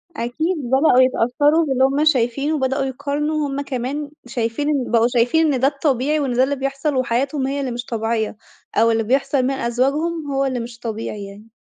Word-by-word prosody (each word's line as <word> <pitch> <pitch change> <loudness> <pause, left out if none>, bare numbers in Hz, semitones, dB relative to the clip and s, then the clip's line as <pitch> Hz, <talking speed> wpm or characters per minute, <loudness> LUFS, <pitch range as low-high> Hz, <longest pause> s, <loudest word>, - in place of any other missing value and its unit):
أكيد 315 +9 -2
بدأوا 265 +1 +4
يتأثّروا 290 +6 +3
باللي 265 -3 +1
هُم 275 +3 +2
شايفينه، 275 +1 +1
وبدأوا 270 -1 0
يقارنوا 290 +3 -2
هُم 275 0 -3
كمان 280 +2 -4 0.2
شايفين 240 +4 -2
إن 275 -5 -1
بقوا 230 0 +4
شايفين 255 +6 +2
إن 255 - 0
ده 265 - +4
الطبيعي، 285 +1 0
وإن 270 -4 -1
ده 250 +2 +3
اللي 280 +2 0
بيحصل 275 +2 -2
وحياتهم 260 +2 0
هي 280 +1 -2
اللي 265 -3 -2
مش 240 +1 -5
طبيعية، 225 -2 -2 0.4
أو 230 +1 +4
اللي 225 0 +1
بيحصل 265 +3 +1
من 260 - +1
أزواجهم 280 +6 -1
هو 275 0 +1
اللي 260 -2 -1
مش 230 0 -8
طبيعي 220 -3 -5
يعني. 205 +3 -12
265 Hz, 185 wpm, -20 LUFS, 240-285 Hz, 0.4 s, بدأوا